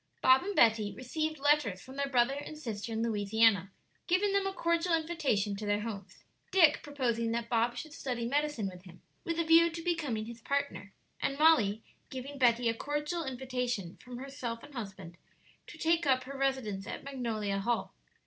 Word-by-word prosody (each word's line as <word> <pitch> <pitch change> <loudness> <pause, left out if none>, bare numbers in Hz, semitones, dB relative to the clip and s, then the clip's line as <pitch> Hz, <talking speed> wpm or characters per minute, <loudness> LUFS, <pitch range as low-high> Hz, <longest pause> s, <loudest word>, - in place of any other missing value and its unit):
Bob 260 +1 +7
and 400 +2 -4
Betty 220 -2 +4
received 310 +5 -3
letters 280 -9 +2
from 260 +6 -12
their 280 0 -1
brother 245 0 +3
and 290 +2 -7
sister 225 -6 -5
in 225 0 -1
Louisiana, 210 -3 +2 0.4
giving 390 +3 +2
them 395 -1 +2
a - - -1
cordial 335 -1 +1
invitation 290 -12 0
to 210 - -5
their 205 0 +1
homes, 205 -3 -7 0.3
Dick 330 -6 +5
proposing 240 -6 -1
that 235 0 -3
Bob 235 0 +1
should 310 -2 -7
study 250 -6 -3
medicine 285 -4 0
with 180 -1 -9
him, 180 -1 -15 0.2
with 335 -1 -2
a 335 - +2
view 330 +1 +6
to 330 0 -6
becoming 290 -11 -1
his 235 0 -9
partner, 280 -7 -2 0.3
and 275 - -1
Molly 230 -10 +4 0.3
giving 270 +2 -7
Betty 240 -1 +4
a 230 - +3
cordial 295 +7 -2
invitation 250 -7 -3
from 250 -1 -10
herself 250 -3 -5
and 290 - -13
husband 195 -7 -7 0.5
to - - -11
take 330 -1 +2
up 255 -1 +3
her 275 +2 -8
residence 260 -8 -1
at - - -6
Magnolia 225 -7 -2
Hall. 235 +4 -1
255 Hz, 180 wpm, -31 LUFS, 225-295 Hz, 0.5 s, Bob